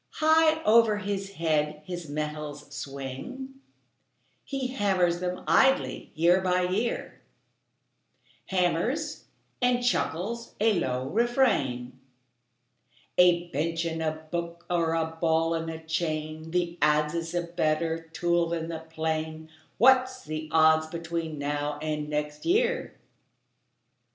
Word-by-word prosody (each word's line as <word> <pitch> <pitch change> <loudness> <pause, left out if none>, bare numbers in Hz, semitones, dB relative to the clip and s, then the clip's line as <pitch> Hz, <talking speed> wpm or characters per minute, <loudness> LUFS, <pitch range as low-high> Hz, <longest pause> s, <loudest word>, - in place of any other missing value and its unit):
High 315 0 +4
over 220 -1 +5
his 200 -1 -4
head 155 -3 0
his 175 -3 -6
metals 150 -1 -5
swing; 140 - -7 0.8
He 270 -2 -3
hammers 190 -7 +1
them 180 0 -3
idly 265 +1 +3
year 175 +4 +4
by 180 -1 +2
year, 205 +6 -2 1.3
Hammers 195 - 0 0.4
and 245 0 +2
chuckles 230 +1 -1
a 220 +1 +4
low 130 -3 -2
refrain: 145 - +1 1.2
"A 175 -1 +5
bench 165 +4 -1
and 165 -1 -2
a 155 0 -3
book 170 0 -4
are 165 -2 +1
a 160 0 -1
ball 165 0 +2
and 165 0 -2
a 160 - -5
chain, 160 -1 -3
The 175 0 -1
adze 150 0 +3
is 165 0 -3
a 175 - +1
better 165 -1 -1
tool 170 0 +1
than 165 -1 -3
the 165 -1 -4
plane; 160 0 -4 0.3
What's 255 +1 +4
the 155 0 -5
odds 160 0 +5
between 165 -1 -4
now 145 +1 -2
and 150 -1 -3
next 150 0 -3
year?" 475 +6 +1
165 Hz, 120 wpm, -27 LUFS, 155-195 Hz, 1.3 s, over